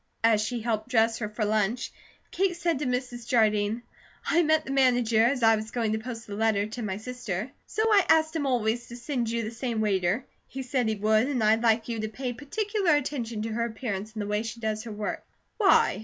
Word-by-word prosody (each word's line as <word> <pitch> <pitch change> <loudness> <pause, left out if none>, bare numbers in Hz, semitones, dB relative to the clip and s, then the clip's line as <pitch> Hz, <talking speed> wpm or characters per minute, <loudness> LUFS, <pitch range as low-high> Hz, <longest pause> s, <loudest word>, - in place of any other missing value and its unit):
As 225 -2 +4
she 230 +2 -2
helped 220 0 -2
dress 225 -2 +2
her 215 -3 -3
for 215 0 -2
lunch, 215 +3 0 0.4
Kate 380 -2 +1
said 340 -4 0
to 290 - -2
Mrs. 250 -1 -3
Jardine: 220 -2 +2 0.4
"I 335 - +3
met 315 -1 +2
the - - -5
manager 245 -4 +3
as 250 +1 +1
I 225 0 +6
was 215 0 -5
going 225 -2 -1
to 220 - 0
post 230 0 -7
a 205 - -7
letter 210 -1 +1
to 220 +3 -6
my 195 -3 -3
sister, 230 -2 -5 0.2
so 435 - -1
I 420 -3 +5
asked 315 0 +4
him 290 -3 0
always 240 -1 0
to 240 - -9
send 240 -1 -2
you 230 0 -1
the 215 - -4
same 235 -1 -3
waiter. 200 +2 +1 0.2
He 265 0 -6
said 250 -2 0
he 220 - 0
would, 215 +3 +2
and 260 -6 0
I'd 220 +1 +4
like 225 -1 +2
you 230 -2 -3
to 215 - -2
pay 250 +2 -4
particular 385 - 0
attention 240 -6 -2
to 225 - -3
her 230 +1 -1
appearance, 220 -3 -4
and 215 -2 -3
the - - -5
way 210 +1 0
she 225 +1 -6
does 220 0 -2
her 230 - -6
work." 210 0 -4 0.3
"Why?" 390 - +4
230 Hz, 230 wpm, -27 LUFS, 215-255 Hz, 0.4 s, I